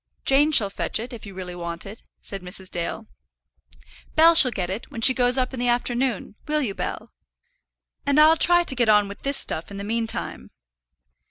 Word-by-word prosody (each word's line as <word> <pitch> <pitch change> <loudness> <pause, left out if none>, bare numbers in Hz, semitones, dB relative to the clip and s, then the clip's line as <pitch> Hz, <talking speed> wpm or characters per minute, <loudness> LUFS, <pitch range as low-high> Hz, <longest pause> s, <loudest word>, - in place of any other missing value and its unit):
"Jane 290 +3 +3
shall 210 -9 +3
fetch - - -2
it, 240 +3 -8
if 220 -3 -10
you 195 - -11
really 180 -1 -7
want 170 -1 -7
it," 205 +3 -11 0.2
said 195 -2 -6
Mrs. 185 +1 -4
Dale. 175 +6 -5 1.1
"Bell 330 +1 +6
shall 285 -6 +8
get 185 -6 -4
it, 200 +5 -7
when 250 -6 -8
she 260 - +6
goes 250 0 +2
up 255 0 -1
in 255 - -6
the 245 - -1
afternoon; 240 -2 -1
will 300 0 0
you, 210 -6 -3
Bell? - - -6 0.9
And 285 +1 +1
I'll 310 +1 +6
try 350 +1 +5
to 275 - +1
get 240 -3 +1
on 210 -1 +4
with 200 +1 -11
this 280 0 -2
stuff 160 - -3
in 200 - -9
the 200 - -6
meantime." 225 +1 -4
235 Hz, 200 wpm, -22 LUFS, 195-270 Hz, 1.1 s, shall